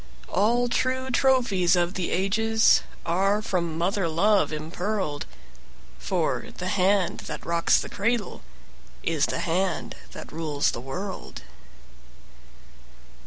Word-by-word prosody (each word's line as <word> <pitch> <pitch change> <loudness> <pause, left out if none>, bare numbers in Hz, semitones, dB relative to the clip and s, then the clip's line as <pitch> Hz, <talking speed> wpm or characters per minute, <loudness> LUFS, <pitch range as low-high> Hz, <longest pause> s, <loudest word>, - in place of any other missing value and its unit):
All 240 +4 +2
true 260 +2 0
trophies 240 -9 +3
of 175 0 +1
the 185 -3 -2
ages 220 +4 +3 0.2
Are 195 +5 +2
from 170 -6 -2
mother 185 +2 0
love 195 +5 +3
impearled; 160 +1 -3 0.7
For - - -1
the 180 - -3
hand 195 -1 +2
that - - -6
rocks 170 0 +3
the - - -4
cradle 225 -1 -1 0.6
Is 160 -3 +1
the - - -2
hand 185 +3 -1 0.2
that - - -9
rules 155 -3 0
the 120 - -6
world. 180 +9 -6
190 Hz, 115 wpm, -26 LUFS, 170-215 Hz, 0.7 s, trophies